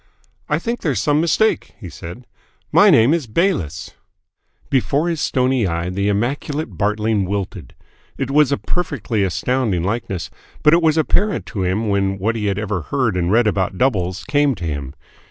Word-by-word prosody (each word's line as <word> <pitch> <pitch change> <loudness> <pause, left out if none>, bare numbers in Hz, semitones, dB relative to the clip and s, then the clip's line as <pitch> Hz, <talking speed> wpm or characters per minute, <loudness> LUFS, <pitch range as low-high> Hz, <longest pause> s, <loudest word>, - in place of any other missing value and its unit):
"I - - +2
think 240 0 -3
there's 140 - -1
some 145 +7 +2
mistake," 215 +6 +1
he 100 - -8
said. 85 +8 -9 0.5
"My - - +6
name 115 +7 +5
is 165 -7 -1
Bayliss." 110 - -1 0.8
Before 140 +4 +1
his 165 -3 -2
stony 130 -4 +1
eye 85 +1 -2
the 100 +2 -1
immaculate 130 - -2
Bartling 105 +2 0
wilted. 95 - -5 0.4
It 135 -1 -2
was 145 -1 +4
a 140 - +2
perfectly 135 - -2
astounding 100 0 0
likeness, 100 -4 -3 0.3
but 150 +1 +6
it 170 - +5
was 160 -1 +3
apparent 200 +6 +1
to 100 - -2
him 95 +5 0
when 100 -1 0
what 110 +4 -1
he 105 -2 -2
had 100 -1 0
ever 105 -3 -2
heard 125 - -1
and 90 0 0
read 115 +2 +4
about 95 -2 0
doubles 95 -8 0
came 145 -1 +2
to 90 -4 -6
him. 70 -3 -4
110 Hz, 175 wpm, -19 LUFS, 95-140 Hz, 0.8 s, My